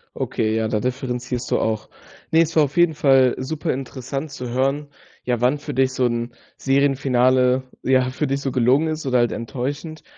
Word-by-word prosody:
Okay, 110 -1 -1
ja, 110 0 0
da 110 -1 0
differenzierst 125 0 -3
du - - +2
auch. 110 -1 -2 0.4
Ne, 165 0 +5
es 165 0 -1
war 155 - +6
auf 145 +1 -4
jeden 175 -2 +4
Fall 135 -4 +4
super 155 +5 -3
interessant 135 +2 -5
zu 125 -3 -6
hören, 135 +4 0 0.4
ja, 120 -2 -1
wann 125 +4 +3
für 145 0 -6
dich 130 0 +1
so 130 -1 +1
'n 120 0 -2 0.2
Serienfinale, 130 -2 +2 0.2
ja, 130 -1 +3
für 130 +4 -2
dich 135 +1 -1
so 135 - -2
gelungen 130 +6 +3
ist 155 -1 -3
oder 125 -2 +2
halt 120 -1 +2
enttäuschend, 140 +6 -5
130 Hz, 190 wpm, -21 LUFS, 125-145 Hz, 0.4 s, war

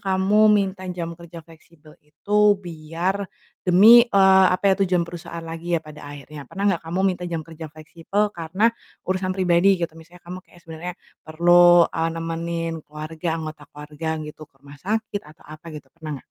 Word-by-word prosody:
kamu 190 +2 +1
minta 195 -3 +1
jam 170 -2 -5
kerja 170 -1 -11
fleksibel 160 -1 -19
itu 200 +8 -2 0.3
biar 170 +4 -3 0.4
demi, 220 +7 +8
eee, 190 -3 +5
apa - - -5
ya, - - +3
tujuan 180 -1 +1
perusahaan 170 0 -8
lagi 165 +1 -4
ya 165 - +1
pada 155 0 -12
akhirnya, 145 +1 -10
pernah 200 0 -5
nggak 170 -2 -2
kamu 175 +3 -2
minta 180 -2 0
jam 165 -2 -4
kerja 160 -1 -9
fleksibel 165 +7 -3
karena 185 +7 0 0.3
urusan 185 0 -2
pribadi 180 0 +3 0.2
gitu? 165 - -8
Misalnya 170 +2 -17
kamu 180 +1 -8
kayak 175 - -20
sebenarnya 165 +2 -7 0.3
perlu, 175 +2 +6
eee, 165 0 -1
nemenin 165 0 -4
keluarga 155 +2 -6
anggota 155 -2 -7
keluarga 150 +2 -8
gitu, 150 0 -10
ke 145 - -51
rumah 145 0 -14
sakit 215 +2 -3
atau 155 - -18
apa 155 +3 -13
gitu, 140 -3 -11
pernah 160 -2 -9
nggak? - - -7
170 Hz, 175 wpm, -22 LUFS, 160-185 Hz, 0.4 s, demi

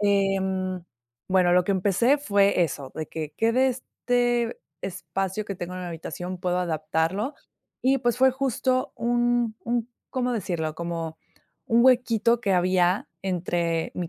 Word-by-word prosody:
em, 190 -2 +1 0.5
bueno, 185 -2 +4
lo 180 0 +4
que 200 - +1
empecé 200 +9 +3
fue 200 -8 +3
eso, 140 -4 -3
de 155 - -4
que 155 -2 -6
que 225 +1 +2
de 260 +2 +4
este 245 -2 -1 0.2
espacio 190 +3 -3
que 200 - -5
tengo 180 +1 -5
en 185 - -5
la 180 - -5
habitación, 175 +2 -6
puedo 180 0 0
adaptarlo. 165 - -1 0.5
Y, 270 +1 +3
pues, 240 -1 0
fue 265 +1 +6
justo 255 -1 0
un 240 -1 +1
un, 235 0 -1 0.2
¿cómo 250 -1 -1
decirlo?, 170 -8 -2
como 165 -1 -4 0.5
un 235 +2 +4
huequito 235 -2 +4
que 200 -5 +1
había 180 +1 +2
entre 175 -3 -1
mi 175 -2 -3
195 Hz, 150 wpm, -25 LUFS, 175-240 Hz, 0.5 s, fue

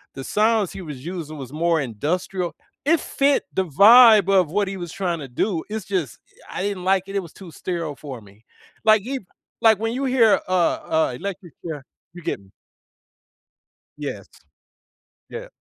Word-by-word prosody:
The 135 - -6
sounds 215 0 +1
he 195 - -7
was 150 -4 -8
using 165 -4 -6
was 135 0 -8
more 165 +1 +1
industrial. 170 - -3 0.3
It 325 +1 +4
fit 280 0 +1
the 190 - 0
vibe 210 - +7
of 185 -5 +3
what 205 0 +1
he 195 0 -4
was 175 -2 -6
trying 175 -4 -2
to 140 - -7
do, 160 - -1
it's 220 0 -4
just 175 - -3 0.3
I 185 - -3
didn't 200 -3 -3
like 190 0 +2
it, 195 - -7
it - - +2
was 170 - -12
too 185 -4 -12
sterile 165 -5 -4
for 135 -6 -9
me. 105 +2 -19 0.4
Like, 215 -1 +6
he 265 +2 -3 0.4
like 220 -3 +5
when 225 +1 -1
you 270 +2 -2
hear, 245 -4 +4
uh, - - -6
uh, 160 -5 +1
Electric 190 -4 -7
Chair, 150 -5 -6 0.3
you 175 - -10
get - - -3 1.6
Yes. - - -6 1.0
Yeah. - - -7
185 Hz, 175 wpm, -22 LUFS, 155-210 Hz, 1.6 s, vibe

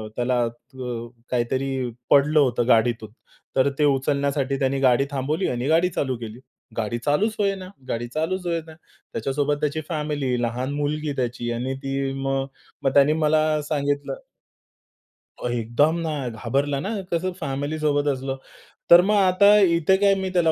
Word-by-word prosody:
त्याला 120 -1 +1
त्व 120 0 -7 0.2
काहीतरी 130 +1 -1 0.2
पडलं 150 +2 +5
होतं 120 -3 +2
गाडीतून. 115 -2 +2 0.5
तर 135 +1 +4
ते - - +3
उचलण्यासाठी 140 0 +1
त्याने 135 0 0
गाडी 130 0 +4
थांबवली 150 +7 -1
आणि 125 +2 -2
गाडी 165 +3 +3
चालू 130 -6 -2
केली. 115 +1 -8 0.4
गाडी 115 +1 -1
चालूच 200 +10 +2
होईना. 195 -2 -1 0.2
गाडी 120 +1 -2
चालूच 180 +4 -1
होईना. 165 -1 -3 0.4
त्याच्यासोबत 145 +1 -1
त्याची 150 +1 -1
फॅमिली, 145 -6 -1
लहान 125 +4 -2
मुलगी 145 0 -2
त्याची 120 -1 -2
आणि 130 +3 -3
ती 135 0 -2
मग, 135 0 0 0.4
मग 135 - +1
त्याने 145 +2 +5
मला 155 0 +2 0.3
सांगितलं. 145 - -1 1.4
एकदम 120 +7 +1
ना 160 -2 -2 0.2
घाबरला 135 +5 -1
ना, 195 - -4 0.2
कसं 185 +2 0
फॅमिली 145 +1 -3
सोबत 145 -1 +1
असलं. 135 -1 -1 0.5
तर 170 +1 +10
मग 210 +3 +2
आता 200 +2 +5
इथे 170 -1 +4
काय, 200 0 +4
मी 190 -1 -2
त्याला 165 -3 +3
140 Hz, 145 wpm, -23 LUFS, 130-155 Hz, 1.4 s, तर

